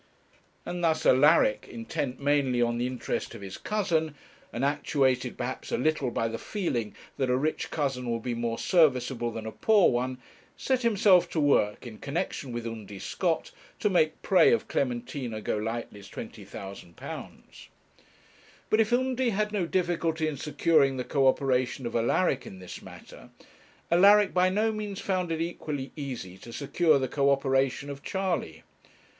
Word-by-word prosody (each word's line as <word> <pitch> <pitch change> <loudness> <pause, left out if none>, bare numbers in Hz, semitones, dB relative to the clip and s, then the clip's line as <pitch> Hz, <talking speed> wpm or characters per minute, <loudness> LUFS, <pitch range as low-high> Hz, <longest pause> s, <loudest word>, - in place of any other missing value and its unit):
And 175 0 -4
thus 160 -1 +1
Alaric, 130 -6 +4
intent 125 +3 -4
mainly 140 -3 +2
on 120 0 +1
the 125 - 0
interest 125 -2 -4
of 110 - -10
his 95 -1 -7
cousin, 165 -8 0 0.4
and 125 +3 -1
actuated 135 -3 +1
perhaps 130 +1 -5
a - - +1
little 150 -1 +1
by 115 -1 -1
the 115 0 -5
feeling 120 - -3 0.2
that 130 -2 0
a 125 - +3
rich 155 +4 -1
cousin 135 -5 -2
would 115 -1 -2
be 125 - -2
more 115 0 -2
serviceable 130 -8 +2
than 115 -1 -6
a 110 - -4
poor 210 - +4
one, 125 +1 -1 0.4
set 260 -1 0
himself 205 -6 +4
to 160 - -2
work, 130 -7 +2
in 110 -3 -9
connexion 140 -2 -3
with 120 -1 -4
Undy 110 -3 -7
Scott, 165 - -2 0.3
to 210 - +1
make 155 -3 +2
prey 185 -3 +5
of 230 - +1
Clementina 125 -2 -2
Golightly's 105 -2 -4
£20,000. 95 -4 -9 1.0
But 215 - +4
if 220 - 0
Undy 255 0 +1
had 210 0 0
no 195 -5 -1
difficulty 170 -3 0
in 155 - -2
securing 145 -2 +2
the 125 - -2
co 135 +1 +2
operation 130 -1 +1
of 120 - -4
Alaric 125 +4 +1
in 95 - -9
this 90 -1 -9
matter, - - -13 0.6
Alaric 200 +3 +6
by 185 0 +4
no 215 +4 +1
means 210 -2 -5
found 185 -3 -1
it 160 0 -1
equally 150 -5 -4
easy 125 - -6
to 120 - -11
secure 150 +4 +2
the 130 -1 -1
co 140 +2 +1
operation 135 0 +1
of 140 0 -8
Charley. 190 +1 -2
140 Hz, 160 wpm, -28 LUFS, 120-175 Hz, 1.0 s, Alaric